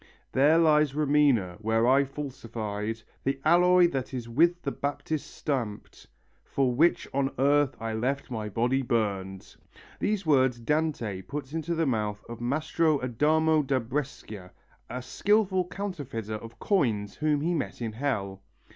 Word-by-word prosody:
There 145 +5 +4
lies 150 -3 +4
Romena, 140 -11 +2
where 110 +1 +2
I 135 +2 +5
falsified 115 -6 -5 0.2
The 135 0 -1
alloy 180 +2 +6
that 135 -3 -4
is 120 -2 -5
with 170 +9 +3
the 140 - -1
Baptist 145 +2 -3
stamped 120 -8 -4 0.4
For 130 -3 0
which 160 +8 +3
on 135 0 +1
earth 140 +1 +3
I 115 0 -3
left 130 +5 -2
my 110 -3 -3
body 125 +5 +1
burned. 100 -6 -2 0.4
These 205 -3 -1
words 130 -5 +3
Dante 120 -7 -1
puts 145 +5 -7
into 165 +1 -2
the 165 0 +1
mouth 105 -5 -2
of 120 0 -8
Mastro 155 +4 +1
Adamo 155 +6 +2
da 135 -2 0
Brescia, 120 -7 -5 0.4
a 125 0 -5
skilful 195 +1 +1
counterfeiter 145 - -5
of 115 +2 -8
coins 115 - 0
whom 150 -1 +1
he 170 +3 0
met 160 - -3
in 115 -2 -3
hell. 105 -6 -3
135 Hz, 145 wpm, -28 LUFS, 115-155 Hz, 0.4 s, alloy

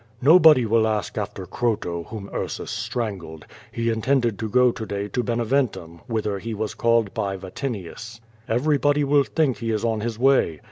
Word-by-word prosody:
"Nobody 155 -4 +7
will 110 0 +3
ask 110 -1 -2
after 105 -3 -4
Croto, 90 -7 -2
whom 105 -3 -7
Ursus - - -4
strangled. 105 -8 -4 0.3
He 115 0 -1
intended 120 -2 0
to 110 - -3
go 125 +2 +4
to 115 -1 -7
day 100 -1 -4
to 125 - -1
Beneventum, 115 -8 -1
whither 105 -3 -2
he 115 +2 -5
was 110 0 -3
called 115 -3 +1
by 100 -1 -2
Vatinius. 110 +2 -6 0.3
Everybody 145 +4 +2
will 140 0 +4
think 140 -6 0
he 115 +1 -4
is 110 0 -1
on 110 -2 0
his 115 0 -3
way. 125 - +2
115 Hz, 170 wpm, -23 LUFS, 105-125 Hz, 0.3 s, Nobody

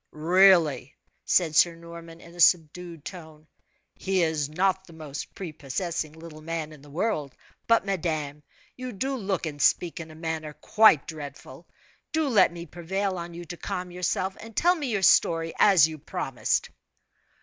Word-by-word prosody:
"Really," 165 -4 +4 0.3
said 165 -4 +2
Sir 170 +1 +5
Norman, 170 0 -11
in 170 - -14
a 175 - -14
subdued 170 -1 +2
tone, 160 -5 -10 0.5
"he 190 -2 0
is 155 -3 -1
not 190 +4 0
the 170 - -14
most 150 -3 -8
prepossessing 160 -1 -4
little 160 -1 -12
man 160 -1 -4
in 150 - -15
the 145 - -16
world; 155 - -2 0.3
but, 230 -3 +3
madame, 155 -6 -2 0.3
you 255 -1 -6
do 265 +7 -2
look 195 -7 -2
and 145 -2 -5
speak 175 -2 +2
in 160 -1 -8
a 155 - -12
manner 160 -1 -4
quite 210 -3 +4
dreadful. 145 -3 -9 0.5
Do 315 -2 +1
let 205 -8 +5
me 170 0 -8
prevail 185 +3 -3
on 170 0 -7
you 175 0 -8
to 175 +2 -8
calm 180 +1 -5
yourself, 180 +2 -2
and 225 -1 -11
tell 350 +1 +4
me 305 -6 -4
your 210 -5 -1
story, 165 -2 +3
as 190 -7 +6
you 155 -1 -8
promised." - - -2
170 Hz, 165 wpm, -26 LUFS, 155-190 Hz, 0.5 s, as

